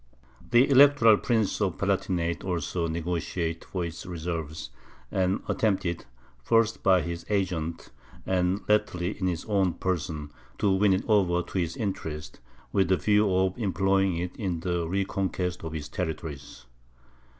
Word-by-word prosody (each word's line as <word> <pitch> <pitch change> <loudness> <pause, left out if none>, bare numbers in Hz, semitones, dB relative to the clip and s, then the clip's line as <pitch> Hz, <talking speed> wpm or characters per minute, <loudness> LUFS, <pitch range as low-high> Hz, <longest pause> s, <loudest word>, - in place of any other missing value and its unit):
The 120 +2 +5
Electoral 135 -5 +7
Prince 110 -4 0
of 95 -5 0
the - - -2
Palatinate 90 -4 0
also 85 -1 -2
negociated 85 0 -2
for 90 -2 -3
its 85 0 -7
services, 80 -6 -5 0.4
and 95 +1 0
attempted, 95 -5 0 0.4
first 115 - +2
by 95 -3 +4
his 85 0 -5
agents, 85 -5 -2 0.3
and 90 +1 +1
latterly 95 -3 +1
in 95 - 0
his 85 -2 -2
own 95 -4 +1
person, 80 -5 -3 0.3
to 100 - +2
win 95 +1 +4
it 95 - -1
over 90 -5 +3
to 95 - -3
his 85 -2 -2
interests, 80 -8 -4 0.3
with 95 -1 +2
the 95 0 +3
view 105 0 +3
of 95 0 +2
employing 95 -2 +1
it 90 +1 -4
in 90 -6 -2
the 85 -2 -1
reconquest 95 -1 -2
of 80 -1 -5
his 75 -2 -5
territories. 75 -6 -5
90 Hz, 145 wpm, -27 LUFS, 85-100 Hz, 0.4 s, Electoral